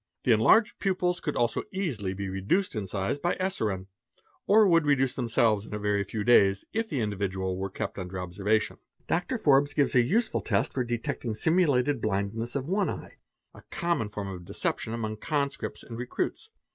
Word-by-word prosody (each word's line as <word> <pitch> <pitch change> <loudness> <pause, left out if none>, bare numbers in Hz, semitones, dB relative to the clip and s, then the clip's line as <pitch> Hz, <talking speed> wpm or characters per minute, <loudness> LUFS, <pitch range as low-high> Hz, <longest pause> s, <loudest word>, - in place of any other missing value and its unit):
The 125 - +3
enlarged 215 - +4
pupils 180 -2 0
could 150 - -3
also 120 -1 +1
easily 130 - -2
be 100 0 -4
reduced 100 - 0
in 105 -3 -3
size 95 +8 -2
by 175 +5 0
eserine, 110 - -1 0.6
or 215 +1 +6
would 165 -4 +4
reduce 135 -3 +3
themselves 115 -4 +2
in 105 - -7
a - - -3
very 105 -1 +1
few 105 +2 -4
days 100 -4 +4
if 225 0 -1
the 135 - -1
individual 95 -3 -2
were 95 +1 -3
kept 95 - -5
under 90 0 -5
observation." 100 +4 0
_ - - -38 0.3
Dr. 180 +9 -1
Forbes 145 -6 +3
gives 145 -2 +2
a 125 - +6
useful 220 - +1
test 100 -3 0
for 130 - 0
detecting 120 -1 -3
simulated 145 -2 +2
blindness 110 +4 -2
of 135 -2 -1
one 195 +3 +1
u - - -2
eye, - - -12 0.4
a - - -14
common 170 -11 -1
form 105 -1 -5
of 90 -2 -7
deception 110 - -2
among 110 -2 -3
conscripts 140 +2 -2
and 115 -1 -8
recruits. 125 0 -3
115 Hz, 185 wpm, -28 LUFS, 100-155 Hz, 0.6 s, or